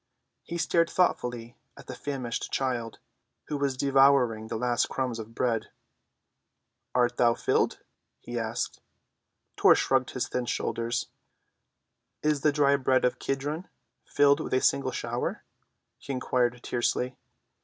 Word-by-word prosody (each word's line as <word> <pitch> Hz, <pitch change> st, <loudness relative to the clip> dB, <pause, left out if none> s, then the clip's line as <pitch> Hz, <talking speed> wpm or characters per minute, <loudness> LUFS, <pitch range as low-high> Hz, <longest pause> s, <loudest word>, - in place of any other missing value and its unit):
He 170 Hz, -, -6 dB
stared 170 Hz, 0 st, +2 dB
thoughtfully 120 Hz, -9 st, 0 dB, 0.2 s
at -, -, -12 dB
the -, -, -7 dB
famished 130 Hz, -5 st, -4 dB
child, 120 Hz, -4 st, -2 dB, 0.5 s
who 150 Hz, -, -1 dB
was 140 Hz, -2 st, -1 dB
devouring 135 Hz, -5 st, +4 dB
the -, -, -4 dB
last 120 Hz, 0 st, +1 dB
crumbs 125 Hz, -3 st, -2 dB
of 110 Hz, +1 st, -9 dB
bread. 115 Hz, -3 st, 0 dB, 1.3 s
"Art 120 Hz, -1 st, +2 dB
thou 120 Hz, -1 st, +4 dB
filled?" -, -, 0 dB, 0.4 s
he 120 Hz, 0 st, -5 dB
asked. 115 Hz, +1 st, -3 dB, 0.7 s
Tor -, -, +6 dB
shrugged 130 Hz, -1 st, +1 dB
his 125 Hz, -, -1 dB
thin 125 Hz, -1 st, -3 dB
shoulders. 115 Hz, +2 st, -2 dB, 1.1 s
"Is 150 Hz, -2 st, +1 dB
the 150 Hz, -, +4 dB
dry 140 Hz, -1 st, +3 dB
bed 130 Hz, -1 st, +2 dB
of 125 Hz, -, 0 dB
Kedron 145 Hz, +6 st, -3 dB, 0.3 s
filled 145 Hz, 0 st, +3 dB
with 155 Hz, -, -2 dB
a 130 Hz, -, +2 dB
single 135 Hz, -1 st, +2 dB
shower?" 120 Hz, 0 st, -3 dB, 0.6 s
he -, -, -7 dB
inquired 125 Hz, -1 st, 0 dB
tersely. 125 Hz, +1 st, -1 dB
125 Hz, 135 wpm, -28 LUFS, 120-140 Hz, 1.3 s, Tor